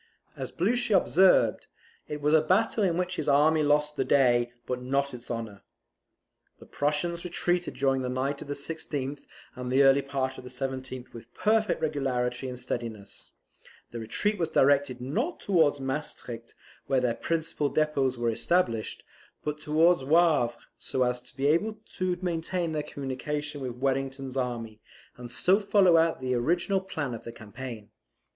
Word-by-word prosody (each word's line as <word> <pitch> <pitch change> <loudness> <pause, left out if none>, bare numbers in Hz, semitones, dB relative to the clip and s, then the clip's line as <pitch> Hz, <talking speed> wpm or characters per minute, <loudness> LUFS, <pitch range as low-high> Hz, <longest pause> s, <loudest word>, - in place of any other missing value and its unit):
As - - -6
Blucher 220 +3 +2
observed, 180 - +4 0.4
it 150 0 -5
was 150 +1 +2
a 160 - +6
battle 205 +7 +2
in 175 -3 +1
which 180 0 -2
his 150 - -1
army 155 +3 +4
lost 150 0 +2
the 135 - +2
day 120 -3 +3
but 125 -1 -3
not 140 +2 0
its 120 0 -9
honour. 115 -4 -5 1.0
The - - -14
Prussians 150 +4 -1
retreated 175 0 -1
during 135 -1 +1
the 125 - -2
night 135 +3 -2
of - - -8
the 145 - -3
16th, 140 -2 -4 0.3
and 125 -1 -5
the 135 +2 +5
early 135 +1 +6
part 135 -1 -3
of - - -10
the 125 - -9
17th, 130 0 -5
with 115 0 -11
perfect 215 -4 +1
regularity 130 -4 -1
and 125 - -6
steadiness, 115 -4 -6 0.6
The 120 - -5
retreat 205 - -1
was 165 -2 0
directed 140 -4 +3
not 230 - -2
towards 160 -7 +2
Maestricht, 130 -4 -5 0.3
where 135 - +3
their 125 -2 +1
principal 160 +1 -1
depots 140 -4 +1
were 120 -1 +1
established, 115 -2 0 0.4
but 150 0 -3
towards 160 +1 +3
Wavre, 150 -5 +3 0.2
so 130 - 0
as 125 0 0
to 125 +2 -15
be 135 - -1
able 205 +9 +2 0.2
to 185 -1 0
maintain 170 0 -1
their 155 -1 -1
communication 145 +1 -4
with 125 -2 -3
Wellington's 135 0 -2
army, 115 -4 -3 0.4
and 120 -1 -9
still 190 +9 +3
follow 200 -4 +4
out 165 -3 +3
the 130 0 -1
original 175 +10 +1
plan 155 -9 -4
of 115 - -7
the 115 - -7
campaign. 115 -1 -9
140 Hz, 165 wpm, -28 LUFS, 125-165 Hz, 1.0 s, a